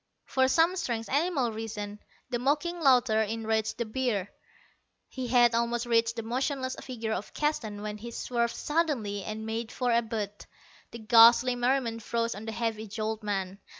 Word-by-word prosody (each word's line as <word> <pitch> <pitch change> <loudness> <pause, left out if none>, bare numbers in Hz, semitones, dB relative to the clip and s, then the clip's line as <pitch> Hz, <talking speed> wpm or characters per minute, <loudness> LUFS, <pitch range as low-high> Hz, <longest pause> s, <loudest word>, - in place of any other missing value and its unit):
For 260 0 +2
some 330 +6 +3
strange 230 -8 -2
animal 285 -4 +1
reason, 215 -2 -6 0.3
the 240 - 0
mocking 300 +7 0
laughter 250 -7 +4
enraged 220 0 -1
the 235 - -1
bear. 215 -4 -2 0.8
He 260 -2 -5
had 240 -1 +5
almost 235 +1 0
reached 230 -1 +2
the 230 - -4
motionless 260 +3 -2
figure 230 -4 -4
of 205 0 -5
Keston 220 -9 -2
when 210 0 -5
he 235 +3 -7
swerved 235 0 -1
suddenly, 270 - -1
and 220 +2 -5
made 225 0 -3
for 250 -1 0
Abud. 220 -3 -2 0.4
The - - -8
ghastly 235 +2 +6
merriment 245 -2 0
froze 230 +1 -1
on 205 +2 -8
the 225 - -4
heavy 220 -1 -3
jowled 215 +1 -3
man. 195 -2 -3
230 Hz, 160 wpm, -28 LUFS, 220-255 Hz, 0.8 s, ghastly